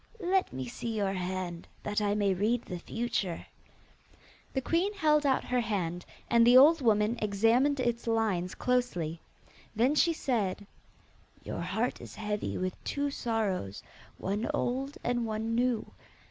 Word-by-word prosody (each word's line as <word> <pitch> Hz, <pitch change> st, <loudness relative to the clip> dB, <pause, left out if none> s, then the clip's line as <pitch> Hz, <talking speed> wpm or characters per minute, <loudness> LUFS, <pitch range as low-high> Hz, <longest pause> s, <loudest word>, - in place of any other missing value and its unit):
'Let 375 Hz, 0 st, +1 dB
me 130 Hz, 0 st, -4 dB
see 225 Hz, -, -4 dB
your 200 Hz, -2 st, 0 dB
hand, 180 Hz, -2 st, -4 dB, 0.2 s
that 210 Hz, +1 st, -1 dB
I 205 Hz, 0 st, +1 dB
may 200 Hz, -2 st, +2 dB
read 220 Hz, +6 st, +1 dB
the 180 Hz, -2 st, -6 dB
future.' 205 Hz, -4 st, -3 dB, 1.1 s
The 265 Hz, -, 0 dB
queen 340 Hz, +9 st, +1 dB
held 300 Hz, -5 st, +3 dB
out 265 Hz, -, +2 dB
her 250 Hz, -, 0 dB
hand, 180 Hz, -6 st, -2 dB, 0.2 s
and 235 Hz, 0 st, +5 dB
the 245 Hz, +1 st, +8 dB
old 300 Hz, +4 st, +7 dB
woman 220 Hz, 0 st, +2 dB
examined 225 Hz, +7 st, +3 dB
its 240 Hz, -2 st, -1 dB
lines 210 Hz, -6 st, 0 dB
closely. 180 Hz, -11 st, -1 dB, 0.5 s
Then 245 Hz, +6 st, +3 dB
she 335 Hz, +3 st, +4 dB
said, 210 Hz, -, -1 dB, 0.8 s
'Your -, -, -4 dB
heart 205 Hz, +8 st, -2 dB
is -, -, -10 dB
heavy 210 Hz, 0 st, -3 dB
with 185 Hz, 0 st, -4 dB
two 285 Hz, 0 st, -1 dB
sorrows, 210 Hz, -, -2 dB, 0.3 s
one 205 Hz, +4 st, -2 dB
old 265 Hz, +3 st, -2 dB
and 240 Hz, -1 st, 0 dB
one 220 Hz, 0 st, -2 dB
new. 240 Hz, -1 st, +1 dB
225 Hz, 145 wpm, -30 LUFS, 195-250 Hz, 1.1 s, the